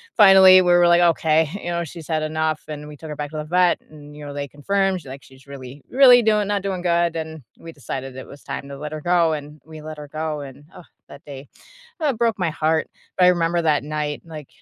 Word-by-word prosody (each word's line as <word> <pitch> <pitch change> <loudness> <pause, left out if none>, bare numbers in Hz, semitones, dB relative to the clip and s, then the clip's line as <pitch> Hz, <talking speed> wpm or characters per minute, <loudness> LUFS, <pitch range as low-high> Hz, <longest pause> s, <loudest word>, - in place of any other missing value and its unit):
finally, 190 -2 +8
we 180 -1 +2
were, 175 0 +5
like, 175 0 +4
okay, 160 -2 +2
you 175 - -5
know, 170 0 -2
she's 165 0 -10
had 155 -2 -1
enough, 155 0 -2
and 150 0 -7
we 150 - -10
took 160 +2 -11
her 150 - -6
back 145 0 -5
to 155 - -7
the 150 - -3
vet, 180 +2 +1
and, 150 -1 -14
you 150 - -10
know, 145 - -7
they 140 0 -5
confirmed, 190 +6 -1
she's, 135 - -13
like, 135 +1 -10
she's 135 +1 -19
really, 135 0 -11
really 250 -2 +6
doing 210 -2 +1
not 205 -1 -1
doing 190 -2 -4
good, 170 -1 0
and 160 -3 -7 0.2
we 165 -1 -11
decided 135 -1 -7
it 130 - -8
was 140 - -13
time 140 - -7
to 140 - -8
let 150 +1 -7
her 155 - -6
go, 170 -2 +2
and 150 0 -8
we 155 -1 -11
let 155 0 -9
her 150 -1 -9
go, 155 0 -4
and 140 +1 -11
ugh, 175 - -13 0.2
that 140 - -13
day, 140 -1 -10 0.5
oh, 300 -4 +1
broke 230 -3 -1
my 180 -3 0
heart, 160 0 -1 0.3
but 180 - +3
I - - +7
remember 170 -1 +1
that 150 -3 +1
night, 150 -1 -4
like, 155 -4 -10
155 Hz, 250 wpm, -21 LUFS, 145-175 Hz, 0.5 s, finally